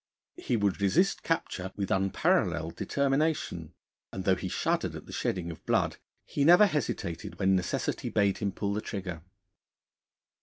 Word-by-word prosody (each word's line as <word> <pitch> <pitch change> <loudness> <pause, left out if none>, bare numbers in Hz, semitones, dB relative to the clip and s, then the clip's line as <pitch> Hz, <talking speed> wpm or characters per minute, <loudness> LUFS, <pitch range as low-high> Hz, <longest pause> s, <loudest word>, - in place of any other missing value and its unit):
He 120 - 0
would 100 -1 0
resist 170 - +2
capture 95 - -2
with 100 -2 -3
unparalleled 95 0 +1
determination, 140 - -1 0.4
and 95 - -5
though 95 - +4
he 95 - -5
shuddered - - -1
at - - -8
the - - -11
shedding 85 -2 -2
of 80 - -11
blood, - - +1 0.3
he 140 - -1
never 175 +7 +8
hesitated 145 - -3
when 95 -1 +3
necessity 90 -2 -1
bade 100 -2 +2
him 100 -2 -1
pull 100 +1 -2
the 105 - -2
trigger. 90 -6 -5
100 Hz, 150 wpm, -29 LUFS, 95-140 Hz, 0.4 s, never